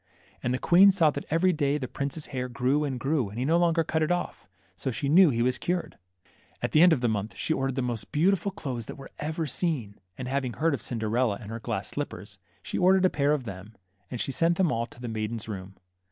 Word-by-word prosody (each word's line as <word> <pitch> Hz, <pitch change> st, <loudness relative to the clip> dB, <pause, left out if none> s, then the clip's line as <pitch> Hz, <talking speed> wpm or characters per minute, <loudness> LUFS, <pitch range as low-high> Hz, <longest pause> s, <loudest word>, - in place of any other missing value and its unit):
And 125 Hz, -, -1 dB
the 125 Hz, -, +1 dB
queen 185 Hz, +8 st, +6 dB
saw 165 Hz, -5 st, +3 dB
that 145 Hz, -, -6 dB
every 180 Hz, +4 st, +3 dB
day 145 Hz, -2 st, +1 dB
the 130 Hz, -3 st, -4 dB
prince's 140 Hz, +4 st, -3 dB
hair 125 Hz, -1 st, -2 dB
grew 135 Hz, +4 st, +1 dB
and 130 Hz, -3 st, -3 dB
grew, 135 Hz, -4 st, 0 dB
and 105 Hz, -, -9 dB
he 125 Hz, -, -1 dB
no 165 Hz, +4 st, +3 dB
longer 170 Hz, -1 st, +3 dB
cut 160 Hz, 0 st, -1 dB
it 155 Hz, -, +1 dB
off. 175 Hz, 0 st, -3 dB, 0.3 s
So -, -, -3 dB
she 130 Hz, +3 st, -2 dB
knew 170 Hz, +4 st, +7 dB
he 120 Hz, -3 st, +1 dB
was 125 Hz, +1 st, 0 dB
cured., 180 Hz, 0 st, -2 dB, 0.6 s
At -, -, -2 dB
the 155 Hz, -, +5 dB
end 180 Hz, 0 st, +8 dB
of 140 Hz, -, +2 dB
the 120 Hz, -, +2 dB
month 105 Hz, -1 st, -2 dB
she 160 Hz, -, 0 dB
ordered 135 Hz, -3 st, -1 dB
the 130 Hz, -, -1 dB
most 120 Hz, -4 st, -4 dB
beautiful 190 Hz, +5 st, +2 dB
clothes 130 Hz, -, -5 dB
that -, -, -7 dB
were 135 Hz, -, -11 dB
ever 160 Hz, +2 st, -2 dB
seen, 135 Hz, -, -2 dB, 0.2 s
and 130 Hz, -, -5 dB
having 130 Hz, -2 st, -1 dB
heard 165 Hz, 0 st, +1 dB
of 140 Hz, -, -3 dB
Cinderella 115 Hz, -1 st, 0 dB
and 110 Hz, -2 st, -9 dB
her 115 Hz, -, -5 dB
glass 110 Hz, -3 st, -3 dB
slippers, 105 Hz, -8 st, -6 dB, 0.2 s
she -, -, -3 dB
or 185 Hz, +1 st, +5 dB
dered 190 Hz, -1 st, +3 dB
a 185 Hz, -, +3 dB
pair 145 Hz, 0 st, +1 dB
of 150 Hz, -3 st, 0 dB
them; 100 Hz, 0 st, -9 dB, 0.3 s
and 125 Hz, -, -5 dB
she 135 Hz, -, -1 dB
sent 165 Hz, +5 st, +2 dB
them 180 Hz, -5 st, +2 dB
all 115 Hz, 0 st, -1 dB
to 120 Hz, -, -17 dB
the 120 Hz, -, -6 dB
maiden's 110 Hz, 0 st, -3 dB
room. 95 Hz, -2 st, -7 dB
135 Hz, 250 wpm, -27 LUFS, 115-160 Hz, 0.6 s, end